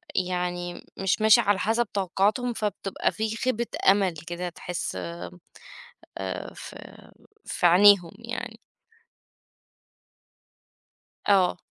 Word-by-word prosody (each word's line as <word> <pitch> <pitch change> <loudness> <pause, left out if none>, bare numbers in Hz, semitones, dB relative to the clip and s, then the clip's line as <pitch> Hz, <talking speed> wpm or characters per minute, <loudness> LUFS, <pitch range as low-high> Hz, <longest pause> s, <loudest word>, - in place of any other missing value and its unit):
يعني 180 -1 -2
مش 195 +3 0
ماشي 220 -1 +7
على 200 -1 +1
حسب 225 +4 +1
توقعاتهم، 205 +5 0
فبتبقى 205 -3 -2
فيه 220 0 -3
خيبة 235 0 -1 0.2
أمل 195 -2 +3
كده 175 +1 -4
تحس 175 - -5 1.2
آمم 95 -1 -5
ف - - -10 0.7
في - - 0
عينيهم 180 -1 +6
يعني. 230 -1 -6 2.7
آه. 190 -3 +4
195 Hz, 90 wpm, -26 LUFS, 180-220 Hz, 2.7 s, ماشي